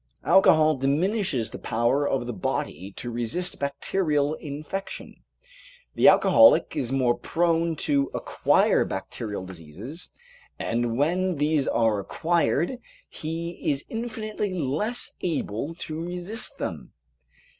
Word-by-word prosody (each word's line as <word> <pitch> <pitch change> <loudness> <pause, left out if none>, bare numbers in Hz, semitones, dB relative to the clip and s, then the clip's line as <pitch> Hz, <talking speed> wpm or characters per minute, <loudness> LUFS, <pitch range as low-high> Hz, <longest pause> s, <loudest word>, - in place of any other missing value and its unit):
Alcohol 155 -5 +5
diminishes 145 - 0
the - - -7
power 120 +6 +1
of 130 -3 -1
the 120 - -4
body 95 -1 -3
to 120 - -6
resist 120 +10 -3
bacterial 145 +1 0
infection. 155 +6 -6 0.8
The - - +4
alcoholic 280 - +6
is 125 -1 -2
more 130 -3 +2
prone 165 -1 0
to 140 -1 +2
acquire - - +2
bacterial 105 -4 -5
diseases, 95 - -9 0.5
and 115 0 -1
when 180 +5 +1
these 150 -1 +1
are 110 -3 +2
acquired 170 - 0 0.3
he 165 +2 -4 0.2
is 140 -1 -1
infinitely 215 -4 -3
less 170 - -2
able 155 - -2
to 160 -1 -5
resist 180 +6 -4
them. - - -5
150 Hz, 115 wpm, -25 LUFS, 120-175 Hz, 0.8 s, alcoholic